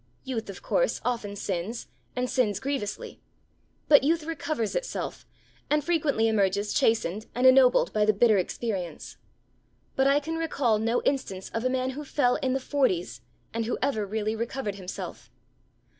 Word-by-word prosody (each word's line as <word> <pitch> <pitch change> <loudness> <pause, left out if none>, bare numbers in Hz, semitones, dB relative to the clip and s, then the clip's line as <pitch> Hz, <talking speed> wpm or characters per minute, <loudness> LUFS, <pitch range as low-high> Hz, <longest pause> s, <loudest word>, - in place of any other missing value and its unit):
Youth, 230 -5 -4
of 195 - -9
course, - - +1
often 220 -5 -2
sins, 195 +4 -3 0.3
and 250 0 0
sins 215 -7 +1
grievously; 265 -5 -4 0.7
but 290 -2 +7
youth 325 +2 +2
recovers 300 -8 -2
itself, - - -4 0.4
and 300 0 +2
frequently 295 -9 +1
emerges 205 -1 +1
chastened 215 -2 +1
and 250 +2 +1
ennobled 260 -1 +6
by 215 - +2
the 215 - +5
bitter 215 0 +4
experience; 185 -4 -4 0.8
but 265 0 +3
I 280 +1 +4
can 325 +3 -4
recall 275 -9 +1
no 230 +2 0
instance 195 -9 -2
of 230 +2 -3
a - - +3
man 260 0 0
who 290 +3 -6
fell 270 -3 +1
in 260 -1 -1
the 270 - +1
forties 185 - 0 0.3
and 230 0 -1
who 240 - -1
ever 260 -6 +1
really 215 +1 -1
recovered 230 -1 -3
himself. 190 -2 -7
240 Hz, 160 wpm, -27 LUFS, 210-275 Hz, 0.8 s, but